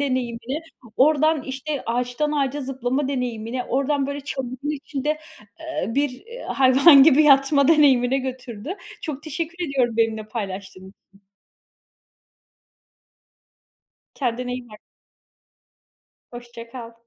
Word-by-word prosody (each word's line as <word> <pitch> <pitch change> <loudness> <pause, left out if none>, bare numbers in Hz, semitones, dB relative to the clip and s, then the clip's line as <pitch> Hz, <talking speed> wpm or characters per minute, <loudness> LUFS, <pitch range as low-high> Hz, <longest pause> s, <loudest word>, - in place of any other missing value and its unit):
deneyimini, 255 0 -2 0.4
oradan, 305 +1 +3
işte, 275 +2 -4
ağaçtan 245 +5 -1
ağaca 285 0 -1
zıplama 265 +1 -2
deneyimini, 245 -2 -3
oradan, 275 +2 0
böyle, 280 0 -4 0.5
içinde, 295 +1 -3 0.4
eee, 320 - -4
bir, 285 -1 +1
eee, 460 - -11
hayvan 270 +3 +6
gibi 305 +1 +6
yatma 280 0 +5
deneyimine 270 -4 +4
götürdü. 255 - -6 0.3
Çok 300 -3 -5
teşekkür 335 +3 -4
ediyorum 245 -4 0
benimle 220 -1 +1
paylaştığın 190 -3 -6 0.2
için. 195 +1 -24 2.9
Kendine 245 -1 -2
iyi 250 -1 -6
bak. 210 - -13 1.5
Hoşça 240 -1 -10
kal. 235 -2 -9
265 Hz, 100 wpm, -23 LUFS, 240-290 Hz, 2.9 s, hayvan